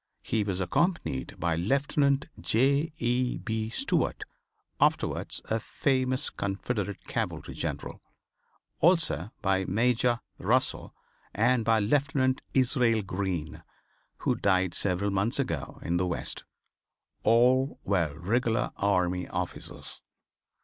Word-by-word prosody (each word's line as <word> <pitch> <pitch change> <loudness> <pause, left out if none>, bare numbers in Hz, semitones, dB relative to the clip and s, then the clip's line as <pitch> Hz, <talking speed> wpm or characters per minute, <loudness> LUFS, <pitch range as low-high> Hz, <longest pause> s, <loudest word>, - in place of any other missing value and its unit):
He 110 -2 0
was 95 -2 -2
accompanied 90 - -1
by 85 0 +1
Lieutenant 140 - +1
J. 135 - +2
E. 125 0 0
B. 110 -1 -3
Stuart, - - 0 0.6
afterwards - - +1
a 110 - 0
famous 130 +2 0
Confederate 100 0 -3
Cavalry - - -3
General; - - -4 0.8
also 160 - +3
by 95 -1 +2
Major 120 +3 +2 0.2
Russell - - 0 0.4
and 120 +2 +3
by 115 0 +3
Lieutenant 130 +3 +1
Israel 125 -4 +3
Green, 90 -5 -3 0.6
who - - +1
died 95 -2 +1
several 100 +1 0
months 100 +6 0
ago 125 - -3
in 85 +1 0
the 90 +1 +1
West. 85 - -2 0.8
All 125 +5 +3
were 85 -7 0
regular 115 +4 0
army 90 -2 +1
officers. - - -6
110 Hz, 110 wpm, -28 LUFS, 95-130 Hz, 0.8 s, also